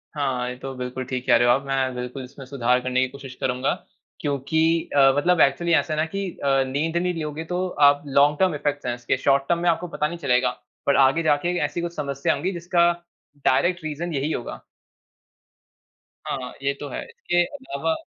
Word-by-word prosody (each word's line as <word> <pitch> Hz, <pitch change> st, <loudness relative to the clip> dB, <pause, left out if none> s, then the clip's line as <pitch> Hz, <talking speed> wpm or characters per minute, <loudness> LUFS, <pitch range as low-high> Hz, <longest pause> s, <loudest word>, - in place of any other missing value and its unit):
हाँ, 130 Hz, -4 st, -1 dB
ये 125 Hz, -, -5 dB
तो 135 Hz, +1 st, -6 dB
बिल्कुल 125 Hz, +1 st, -4 dB
ठीक 125 Hz, 0 st, -4 dB
कह 120 Hz, -, +6 dB
रहे 120 Hz, +1 st, +3 dB
हो 120 Hz, -, +6 dB
आप 135 Hz, -, 0 dB
मैं 135 Hz, -1 st, 0 dB
बिल्कुल 125 Hz, +2 st, -5 dB
इसमें 135 Hz, +2 st, -11 dB
सुधार 125 Hz, -2 st, +1 dB
करने 130 Hz, 0 st, 0 dB
की 130 Hz, -, +2 dB
कोशिश 135 Hz, 0 st, -10 dB
करूँगा। 125 Hz, +1 st, 0 dB, 0.5 s
क्योंकि 145 Hz, +2 st, -1 dB, 0.3 s
अ, 135 Hz, -1 st, +7 dB
मतलब 175 Hz, +3 st, +3 dB
एक्चुअली 170 Hz, +5 st, +3 dB
ऐसा 160 Hz, 0 st, +2 dB
है 155 Hz, -, -1 dB
ना 155 Hz, -, +2 dB
कि 195 Hz, +4 st, -4 dB, 0.2 s
अ, 135 Hz, -1 st, +3 dB
नींद 155 Hz, +5 st, -1 dB
नहीं 180 Hz, +1 st, 0 dB
लोगे 150 Hz, +1 st, -4 dB
तो 180 Hz, +2 st, -1 dB, 0.2 s
आप 145 Hz, 0 st, +4 dB
लॉन्ग 145 Hz, +2 st, +4 dB
टर्म 185 Hz, -4 st, +3 dB
इफेक्ट्स 145 Hz, -1 st, -2 dB
है 120 Hz, -, 0 dB
इसके। 120 Hz, +2 st, -1 dB
शॉर्ट 135 Hz, +1 st, +3 dB
टर्म 170 Hz, -1 st, +2 dB
में 175 Hz, -, +4 dB
आपको 170 Hz, +1 st, 0 dB
पता 150 Hz, -3 st, -1 dB
नहीं 170 Hz, +3 st, -6 dB
चलेगा, 125 Hz, -5 st, +2 dB, 0.4 s
पर 140 Hz, -, +3 dB
आगे 135 Hz, +5 st, +4 dB
जाके 160 Hz, +3 st, +1 dB
ऐसी 170 Hz, -, -3 dB
कुछ 170 Hz, 0 st, -4 dB
समस्या 140 Hz, -2 st, -1 dB
होंगी 180 Hz, +6 st, -2 dB
जिसका 170 Hz, 0 st, +2 dB, 0.5 s
डायरेक्ट 175 Hz, +6 st, +2 dB
रीज़न 160 Hz, +3 st, -4 dB
यही 145 Hz, +2 st, -1 dB
होगा। -, -, -5 dB, 1.6 s
हाँ, 130 Hz, -2 st, -4 dB
ये 140 Hz, 0 st, +1 dB
तो 145 Hz, -, -6 dB
है। -, -, -5 dB
इसके 175 Hz, 0 st, 0 dB
अलावा 165 Hz, -, -2 dB
140 Hz, 200 wpm, -24 LUFS, 130-165 Hz, 1.6 s, अ